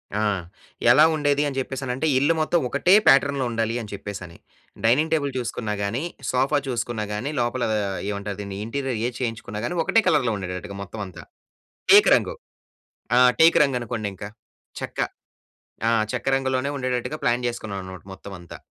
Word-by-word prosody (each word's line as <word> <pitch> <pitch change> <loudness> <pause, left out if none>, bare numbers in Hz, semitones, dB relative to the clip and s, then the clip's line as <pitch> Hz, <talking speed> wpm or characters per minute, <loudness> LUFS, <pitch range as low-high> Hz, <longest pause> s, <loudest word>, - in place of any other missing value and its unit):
ఆ! 105 - 0 0.7
ఎలా 150 +6 +7
ఉండేది 145 -1 +1
అని 135 -1 -4
చెప్పేసనంటే 130 +2 -2
ఇల్లు 145 +5 +3
మొత్తం 165 +2 +2
ఒకటే 145 +9 +3
ప్యాటర్న్‌లో 140 -1 +4
ఉండాలి 115 0 -1
అని 105 - -9
చెప్పేసని. 95 -4 -7 0.5
డైనింగ్ 145 +8 +3
టేబుల్ 145 -3 +1
చూసుకున్నా 115 -3 -3
గాని, 115 +8 -2 0.3
సోఫా 135 +4 +2
చూసుకున్నా 120 -3 -2
గాని 105 +7 -3
లోపల 120 +1 0 0.5
ఏమంటారు 100 0 -4
దీన్ని 100 -1 -6
ఇంటీరియర్ 130 -1 -3
ఏది 125 - -6
చేయించుకున్నా 110 -3 -4
కానీ 175 - -3
ఒకటే 225 - +3
కలర్‌లో 130 -9 +3
ఉండేటట్టుగా 95 +1 -6
మొత్తం 105 +3 -8
అంతా. 95 - -11 0.7
టేకు 405 +1 +8
రంగు. - - -1 0.8
ఆ! - - +6 0.2
టేకు 165 +1 +7
రంగు 135 -3 0
అనుకోండి 110 -4 -3
ఇంక. 100 - -9 0.6
చెక్క - - -7 0.9
ఆ! - - +4 0.2
చెక్క 125 0 -4
రంగులోనే 130 0 0
ఉండేటట్టుగా 130 +3 -2
ప్లాన్ 120 +1 +1
జేసుకున్నాననమాట 95 -6 -6
మొత్తం 95 +1 -11
అంతా. 85 -1 -11
125 Hz, 150 wpm, -24 LUFS, 105-140 Hz, 0.9 s, టేకు